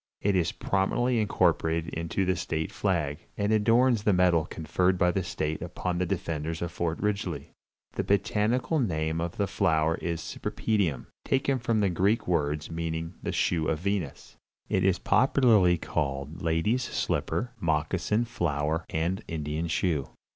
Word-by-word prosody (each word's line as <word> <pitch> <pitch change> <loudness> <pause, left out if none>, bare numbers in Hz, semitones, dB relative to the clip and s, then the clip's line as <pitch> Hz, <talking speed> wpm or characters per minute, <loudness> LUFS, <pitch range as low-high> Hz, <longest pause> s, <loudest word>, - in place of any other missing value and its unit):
It 100 -1 +1
is 85 -2 +2
prominently 120 +5 0
incorporated 85 -5 +1
into 85 +4 -1
the 95 0 +1
state 80 -3 -3
flag, 80 -7 -1 0.2
and 105 +1 0
adorns 115 +2 +4
the 105 -1 +3
medal 90 -3 +3
conferred 90 +3 0
by 90 0 +3
the 95 - 0
state 80 -2 -3
upon 90 -1 -3
the 90 - 0
defenders 80 -3 -3
of 85 - -3
Fort 85 -1 -2
Ridgely. 105 0 -2 0.4
The - - -1
botanical 110 - +1
name 80 - 0
of 85 +1 -4
the 100 - +2
flower 80 -3 +1
is 85 -1 -2
Cypripedium, 95 - -1 0.2
taken 135 0 +1
from 115 -3 +1
Greek 100 +6 +1
words 75 -3 0
meaning 80 0 -3
the - - -2
shoe 80 -3 +1
of 80 - +1
Venus. 95 -7 -3 0.3
It - - +1
is 95 -1 +3
popularly 115 -9 +4
called 70 -2 -3
"Lady's 85 +10 +1
Slipper," 120 0 -1
"Moccasin 85 +7 0
Flower" 80 -6 -1
and 85 +4 -1
"Indian 75 +1 -3
Shoe." 80 -4 0
85 Hz, 145 wpm, -28 LUFS, 80-105 Hz, 0.4 s, adorns